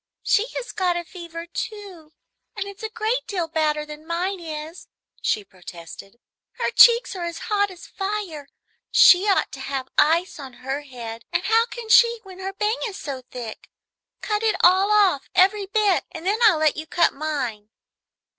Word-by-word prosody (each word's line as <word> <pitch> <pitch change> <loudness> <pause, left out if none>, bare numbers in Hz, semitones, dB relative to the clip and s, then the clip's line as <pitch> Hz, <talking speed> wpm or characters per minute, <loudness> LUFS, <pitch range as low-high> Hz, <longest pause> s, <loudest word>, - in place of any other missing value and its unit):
"She 440 +2 +2
has - - -5
got 360 -3 0
a 345 - -3
fever, 335 -1 -9
too, 360 -4 -7 0.4
and 400 - -3
it's 400 0 -10
a 440 - -4
great 455 +3 -1
deal 360 -5 -2
badder 305 -2 0
than 300 +1 -11
mine 360 +3 -2
is," 315 +1 -8 0.3
she 210 - 0
protested. 185 +2 -12 0.4
"Her 475 - -2
cheeks 470 -2 +6
are 350 -2 -4
as 340 -1 -5 0.2
hot 405 0 +2
as 365 -2 -12
fire. 385 -8 -5 0.4
She 375 +3 +6
ought 390 - +2
to 270 - -9
have 265 -1 -4
ice 330 +3 +2
on 265 -3 -9
her 270 +2 -2
head, 235 -5 -9
and - - 0
how 450 +3 +3
can 475 -2 -8
she 470 +1 +5
when 380 -2 -12
her 380 +1 -4
bang 425 +3 -1
is 405 -3 -7
so 275 -8 -6
thick? 240 -4 -8 0.5
Cut 420 -1 -1
it 445 -1 +2
all 375 +3 +5
off, 390 -9 +3
every 390 +2 +3
bit, 410 -2 +2
and 330 0 -9
then 410 +4 +1
I 415 - +6
will 315 - -2
let 310 -2 +2
you 310 +1 -6
cut 340 +1 +2
mine." 265 -8 -4
355 Hz, 185 wpm, -23 LUFS, 300-410 Hz, 0.5 s, cheeks